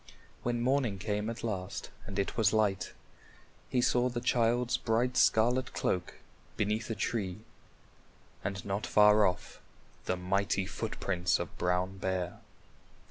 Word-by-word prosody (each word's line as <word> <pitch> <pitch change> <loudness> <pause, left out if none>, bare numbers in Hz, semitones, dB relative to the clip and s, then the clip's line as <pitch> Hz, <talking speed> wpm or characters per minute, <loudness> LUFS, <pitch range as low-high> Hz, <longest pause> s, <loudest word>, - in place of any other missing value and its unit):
When 120 -1 -1
morning 125 -5 +1
came 105 +2 -2
at 115 - -6
last 95 -5 -4 0.2
and 95 0 -6
it 100 - -1
was 110 -3 +3
light, 100 -4 +1 0.8
he 125 - +2
saw 125 +1 +3
the 120 -1 -3
child's 120 0 +2
bright 120 +3 0
scarlet 125 +4 +3
cloak 90 +1 -1 0.4
beneath 105 +2 0
a 115 - -1
tree 100 -2 -2 1.0
and 95 -1 -4
not 100 +1 -2
far 105 0 +6
off 90 - -5 0.4
the 90 - 0
mighty 100 +1 0
footprints 90 -2 -1
of - - -5
Brown 90 +2 0
Bear. 90 -2 -2
105 Hz, 135 wpm, -31 LUFS, 95-115 Hz, 1.0 s, far